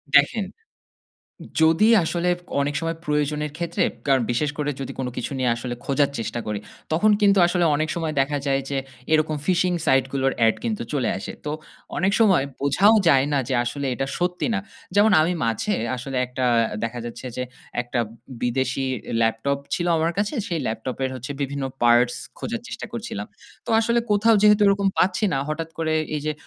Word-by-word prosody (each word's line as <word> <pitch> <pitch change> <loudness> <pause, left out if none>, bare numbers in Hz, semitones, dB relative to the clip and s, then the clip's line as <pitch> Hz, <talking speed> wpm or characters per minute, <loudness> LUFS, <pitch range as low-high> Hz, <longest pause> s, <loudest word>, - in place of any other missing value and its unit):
দেখেন, 145 +9 +4 1.2
যদি 165 +6 +5 0.2
আসলে 175 +2 0 0.3
অনেক 145 +1 -1
সময় 165 0 -2
প্রয়োজনের 150 0 0
ক্ষেত্রে 170 0 -1 0.2
কারন 135 -3 +4
বিশেষ 145 +5 0
করে 150 -1 -1
যদি 135 - -4
কোন 130 - -1
কিছু - - -3
নিয়ে 125 -1 +2
আসলে 120 +1 -4
খোঁজার 140 0 +2
চেষ্টা 115 +1 -3
করি, 105 -1 -2 0.3
তখন 210 +7 +4
কিন্তু 200 -1 +5
আসলে 175 0 +1
অনেক 155 +2 -1
সময় 165 -2 -2
দেখা 145 +2 -1
যায় 135 0 +2
যে 140 - -1 0.4
এরকম 155 0 +2
phishing 180 -1 +2
site 135 0 +3
গুলোর 135 -1 +1
এড 110 - +3
কিন্তু 225 -3 -2
চলে 130 -6 +1
আসে। 95 - -6
তো 150 - -2 0.5
অনেক 190 +2 +2
সময় 195 -10 +5 0.2
বোঝাও 145 +10 +4
যায় 135 -4 +5
না 140 - +3
যে - - 0
আসলে 140 +3 -3
এটা 135 - -1
সত্যি 180 0 0
না। 200 - +1 0.4
যেমন 210 +2 +5
আমি 165 +3 +1
মাঝে 115 - 0 0.2
আসলে 130 +1 -4
একটা 125 +1 -2 0.4
দেখা 115 +1 -3
যাচ্ছে 120 +2 -7
যে 125 - -1 0.4
একটা 120 0 -3 0.4
বিদেশি 130 +2 0 0.4
ল্যাপটপ 115 +5 +1 0.2
ছিল 175 - 0
আমার 160 +1 +1
কাছে। 205 +4 0
সেই 170 -2 -2
ল্যাপটপের 130 +4 -3
হচ্ছে 130 +3 -6
বিভিন্ন 140 0 -2 0.2
পার্টস 120 +1 +4 0.2
খোঁজার - - -4
চেষ্টা - - -6
করছিলাম। 105 +1 -5 0.4
তো - - -8
আসলে 235 +1 +2
কোথাও 215 +2 +4
যেহেতু 210 0 +6
এরকম 200 0 +3
পাচ্ছি 185 +4 +2
না - - +1
হঠাৎ 160 +1 -3
করে 160 -1 0 0.2
এই 150 - -2
যে 155 - +1
145 Hz, 175 wpm, -23 LUFS, 130-175 Hz, 1.2 s, যেহেতু